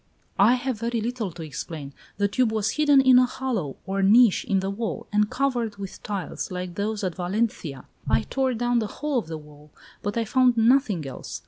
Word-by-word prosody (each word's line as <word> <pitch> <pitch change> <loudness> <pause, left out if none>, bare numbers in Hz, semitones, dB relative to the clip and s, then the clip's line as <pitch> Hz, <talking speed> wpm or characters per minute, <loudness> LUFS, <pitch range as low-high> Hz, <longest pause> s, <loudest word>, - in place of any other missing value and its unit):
"I 215 +6 +6
have 255 -3 -3
very 235 +1 -1
little 225 -3 -3
to 170 -1 -8
explain. 150 -1 -7 0.2
The 200 0 +2
tube 230 +3 +1
was 215 -1 0
hidden 290 -3 +4
in 260 -1 +7
a 255 - +4
hollow, 230 - -3
or 195 +1 -1
niche, 215 +2 +5
in 195 - +1
the 190 +1 -2
wall, 225 +2 -4
and 210 0 +3
covered 245 -6 -1
with 195 -2 -8
tiles, 200 -3 -4
like 180 -1 -5
those 210 +2 -2
at 185 -2 -1
Valencia. 180 - -2 0.2
I 120 -2 +3
tore 265 - -1
down 240 +1 +1
the 220 - -2
whole 295 +3 -2
of 185 - -8
the 160 -1 -5
wall, 150 0 -15 0.3
but 205 +2 -3
I 230 - +1
found 250 +1 +3
nothing 225 - +3
else. 135 - -7
215 Hz, 205 wpm, -25 LUFS, 185-245 Hz, 0.3 s, in